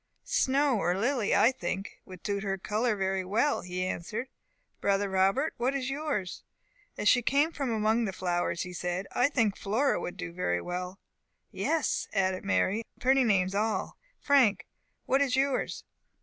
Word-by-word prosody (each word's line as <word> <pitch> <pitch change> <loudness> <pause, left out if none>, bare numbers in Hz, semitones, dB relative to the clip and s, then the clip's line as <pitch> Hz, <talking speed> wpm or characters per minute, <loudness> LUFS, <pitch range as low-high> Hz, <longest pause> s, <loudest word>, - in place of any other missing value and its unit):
"Snow 270 -3 +2
or 175 0 +1
Lily, 235 0 +1
I 210 +5 +5
think, 195 -4 -5
would 185 -1 -12
suit 200 -1 -1
her 195 -1 -2
colour 215 +4 0
very 190 -1 -1
well," 225 +10 +1
he 180 0 -3
answered. 215 +8 -4 0.5
"Brother 200 0 +1
Robert, 195 +10 +2
what 255 +3 0
is 265 -1 -2
yours?" 275 -11 -3 0.6
"As 210 - -1
she 245 - +6
came 285 +7 +2
from 275 -5 -3
among 220 +1 +1
the 195 - -2
flowers," 175 -2 -1
he 180 - -8
said, 180 +2 -3
"I 250 +3 +2
think 225 -8 +1
Flora 230 +8 +1
would 180 - -5
do 180 -2 -6
very 90 - 0
well." 180 - -5 0.5
"Yes," 325 -2 0
added 190 -2 0
Mary, 200 0 +1
"and 230 - -4 0.2
very 260 +1 +5
pretty 270 -1 +4
names 190 -5 +2
all 215 +2 -1 0.2
Frank, 265 -8 +3 0.4
what 270 +1 +2
is 265 -3 +2
yours?" 270 0 0
210 Hz, 170 wpm, -29 LUFS, 185-260 Hz, 0.6 s, she